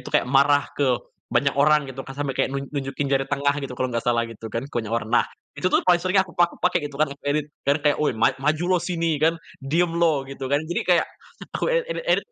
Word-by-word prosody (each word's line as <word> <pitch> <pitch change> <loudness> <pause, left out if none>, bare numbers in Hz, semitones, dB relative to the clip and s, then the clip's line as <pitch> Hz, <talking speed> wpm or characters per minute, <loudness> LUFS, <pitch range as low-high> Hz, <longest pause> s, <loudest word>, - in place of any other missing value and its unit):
itu - - -9
kayak - - +4
marah 140 +2 +4
ke 145 - +1 0.4
banyak 140 -1 +2
orang 150 0 +4
gitu 130 0 -7
kan, 135 - -7
sampai 145 -1 -2
kayak - - +1
nun 140 - -3
nunjukin 140 0 -3
jari 135 0 +2
tengah 140 +1 +1
gitu 135 -2 -5
kalau 130 - -1
nggak 115 - 0
salah, 120 -1 +3
gitu 115 -1 -8
kan 115 +3 -3
ke 140 - -13
banyak 110 - -7
orang. 115 -1 -4
Nah, - - +5 0.3
itu - - -3
tuh - - +2
paling 175 -1 +4
sering 185 +2 0
yang 190 - +5
aku 180 - -14
pak 175 0 +3
pakai, 180 - +3
gitu 140 - -11
kan, 155 +2 +3
aku 140 - -16
edit, 150 +1 +1 0.2
biar 140 - +4
kayak, 150 - +4
"Woi 150 - +2
ma 110 - +4
maju 150 +4 +1
loh 180 - +3
sini." 165 -4 0
Kan, 165 +2 +3 0.2
"Diem 165 +6 +1
loh." 165 -5 +2
Gitu 135 0 -10
kan. 140 +2 +2
Jadi, 175 +2 -2
kayak 175 -2 +4 0.5
aku - - -2
ed - - +2
edit-edit - - 0
145 Hz, 260 wpm, -23 LUFS, 135-170 Hz, 0.5 s, Nah